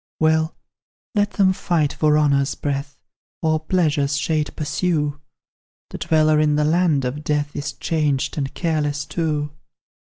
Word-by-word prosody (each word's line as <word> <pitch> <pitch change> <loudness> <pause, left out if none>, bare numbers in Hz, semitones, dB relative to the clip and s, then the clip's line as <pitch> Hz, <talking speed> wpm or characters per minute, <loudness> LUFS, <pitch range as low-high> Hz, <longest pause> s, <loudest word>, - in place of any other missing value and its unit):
Well, 160 0 +2 0.6
let 205 -1 +1
them 190 -2 +3
fight 160 -5 0
for 150 -1 +3
honour's 140 -2 +2
breath, 140 0 -3 0.5
Or 155 -1 +2
pleasure's 155 -4 +1
shade 150 +3 0
pursue 150 -2 -1 0.7
The - - -6
dweller 155 -2 +3
in 150 -1 +3
the 150 0 +2
land 160 -4 +2
of 140 +4 -4
death 145 -1 -1
Is 145 +1 -3
changed 150 -5 -1
and 140 -3 -2
careless 150 -4 -1
too. 150 -2 -2
150 Hz, 135 wpm, -21 LUFS, 145-160 Hz, 0.7 s, them